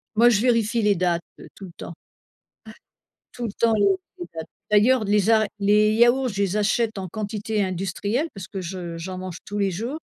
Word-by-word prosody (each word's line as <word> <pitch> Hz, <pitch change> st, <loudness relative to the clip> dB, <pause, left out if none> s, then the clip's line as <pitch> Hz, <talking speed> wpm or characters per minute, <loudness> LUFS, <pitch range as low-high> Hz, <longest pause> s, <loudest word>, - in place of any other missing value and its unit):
Moi, 235 Hz, +3 st, +6 dB
je 215 Hz, -3 st, +2 dB
vérifie 230 Hz, -2 st, +2 dB
les 210 Hz, -1 st, +3 dB
dates, 175 Hz, -1 st, 0 dB, 0.2 s
heu, -, -, -11 dB
tout 195 Hz, -, -10 dB
le 180 Hz, -, -11 dB
temps. -, -, -8 dB
Ouais, -, -, -8 dB, 1.4 s
tout 245 Hz, -, -5 dB
le 220 Hz, -, -3 dB
temps, 230 Hz, 0 st, +2 dB
les 205 Hz, -, +3 dB, 0.3 s
les 350 Hz, -, -5 dB
dates. 160 Hz, -1 st, -6 dB, 0.2 s
D'ailleurs, 220 Hz, +4 st, +4 dB
les 205 Hz, 0 st, +2 dB
a 220 Hz, -1 st, +5 dB
les 210 Hz, +1 st, +4 dB
yaourts, 240 Hz, +3 st, +4 dB
je 200 Hz, -2 st, -3 dB
les 200 Hz, +1 st, 0 dB
achète 220 Hz, +1 st, +1 dB
en 190 Hz, -1 st, -4 dB
quantité 210 Hz, +2 st, -3 dB
industrielle, 195 Hz, -, -2 dB
parce 195 Hz, -2 st, -8 dB
que 195 Hz, -2 st, -6 dB
je 175 Hz, -1 st, -6 dB
j'en 185 Hz, +2 st, -6 dB
mange 185 Hz, -2 st, -6 dB
tous 205 Hz, -, -5 dB
les 200 Hz, -1 st, +1 dB
jours, 235 Hz, -, -4 dB
205 Hz, 205 wpm, -23 LUFS, 190-225 Hz, 1.4 s, Moi